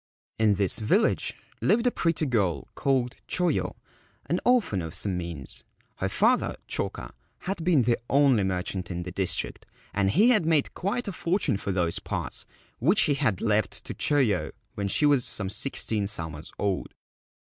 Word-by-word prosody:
In 110 -2 +4
this 100 +2 +1
village 110 - +1 0.3
lived 230 +5 +3
a 245 - +4
pretty 165 -5 +1
girl 105 - 0
called 130 -2 0
Choyo, 180 -1 0 0.5
an - - 0
orphan 235 - +2
of 80 +1 -5
some 95 +1 -3
means. 85 -6 -4 0.3
Her - - -1
father, - - +2
Choka, - - -3 0.3
had 185 -3 -3
been 165 -7 +4
the 120 0 +1
only 135 -6 +4
merchant 95 -1 -2
in 90 -1 -3
the 90 - -6
district, 95 +1 -3 0.3
and 100 -1 +2
he 210 - +5
had 220 -8 +4
made 160 -3 +2
quite 205 +5 -2
a - - -1
fortune 180 - 0
for 100 - -3
those 85 -3 0
parts, - - -4 0.3
which 175 - +4
he 150 - +3
had 130 -10 0
left 110 -2 0
to - - -5
Choyo 130 -11 +1 0.2
when 100 -1 -2
she 125 +9 +2
was 145 -4 +4
some 100 -5 +1
sixteen 110 -4 0
summers 80 -6 -3
old. 100 -3 -2
110 Hz, 165 wpm, -27 LUFS, 95-155 Hz, 0.5 s, he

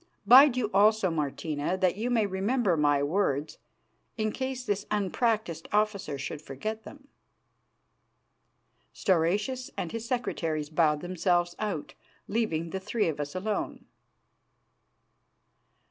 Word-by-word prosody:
Bide 260 +1 +8
you 220 -4 -1
also, 205 -1 +4
Martina, 150 +2 -2
that 185 -1 +2
you 225 +5 -2
may 230 -3 +2
remember 200 +1 +1
my 145 -2 +2
words 150 -2 -1 0.6
in 215 -1 0
case 260 0 -4
this 205 -2 -2
unpractised 210 -3 -1
officer 210 -8 0
should 145 +2 -5
forget 215 +11 -5
them." 280 +5 -13 1.9
Stauracius 205 +9 0
and 170 - -3
his 230 0 -5
secretaries 160 - -2
bowed 155 -2 +2
themselves 175 -1 0
out, 200 -8 -3 0.3
leaving 170 -7 -1
the 190 - -3
three 210 0 0
of 150 - -4
us 145 +3 -4
alone. 205 +3 -3
190 Hz, 115 wpm, -28 LUFS, 160-220 Hz, 1.9 s, Bide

